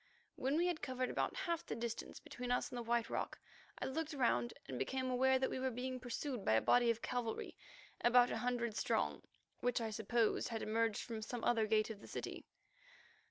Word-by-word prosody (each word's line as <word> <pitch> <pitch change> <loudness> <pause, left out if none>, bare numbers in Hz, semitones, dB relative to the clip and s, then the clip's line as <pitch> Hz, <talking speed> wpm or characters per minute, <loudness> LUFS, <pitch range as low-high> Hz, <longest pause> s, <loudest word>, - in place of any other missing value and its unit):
When 270 +4 +1
we 345 - +3
had 350 -3 0
covered 255 -1 -1
about - - 0
half 340 -3 -1
the - - -4
distance 230 0 -4
between 250 0 -6
us 250 - +1
and 250 - -4
the - - -2
White 235 0 +1
Rock, - - -2 0.4
I - - -3
looked 310 +3 -2
round 120 - +2 0.2
and 130 -2 -4
became 260 - -1
aware 260 +1 +4
that 260 - 0
we - - -2
were 260 0 +1
being 255 +1 -3
pursued 250 -1 -3
by - - +3
a 110 - +6
body 245 -1 +5
of 230 0 0
cavalry 240 -3 -2 0.5
about 245 0 +6
a - - -1
hundred 240 -3 -1
strong, - - 0 0.4
which 245 0 +1
I 225 -1 -2
supposed 220 +1 +1
had 225 -2 -3
emerged 225 0 +1
from 225 -2 -5
some 235 +2 -4
other 225 -2 +3
gate 215 0 +3
of 210 -2 -8
the - - -11
city. - - -5
245 Hz, 210 wpm, -38 LUFS, 225-255 Hz, 0.5 s, a